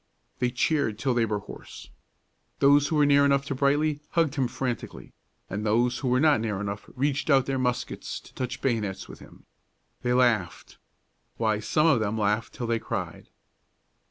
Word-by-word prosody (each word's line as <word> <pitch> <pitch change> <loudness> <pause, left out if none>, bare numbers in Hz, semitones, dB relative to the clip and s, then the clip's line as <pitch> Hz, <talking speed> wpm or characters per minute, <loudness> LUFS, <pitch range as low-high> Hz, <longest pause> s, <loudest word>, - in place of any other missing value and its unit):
They 125 - +1
cheered 125 -3 0
till 130 +2 0
they 120 -2 +1
were 105 -1 -1
hoarse. 100 - -11 0.7
Those 140 +1 +5
who 155 - -1
were 150 -1 +4
near 140 0 +5
enough 140 -1 +2
to 140 - -3
Brightly 145 +2 +1
hugged 165 -5 +2
him 135 -4 0
frantically, 125 0 -5 0.3
and 100 +3 -4
those 120 +3 +1
who 135 - -3
were 125 +1 +3
not 150 -5 +4
near 105 -4 -2
enough 100 0 -5
reached 140 +3 -1
out 135 -3 +4
their 135 -1 -1
muskets 125 -1 -3
to - - -18
touch 130 0 -5
bayonets 105 -7 -2
with - - -11
him. - - -16 0.6
They 125 0 0
laughed 120 -8 0 0.6
why, 110 -2 +1
some 150 +8 +1
of 150 -7 +4
them 110 0 -1
laughed 105 +2 -1
till 125 - -4
they 115 0 0
cried. - - -5
125 Hz, 180 wpm, -26 LUFS, 110-140 Hz, 0.7 s, Those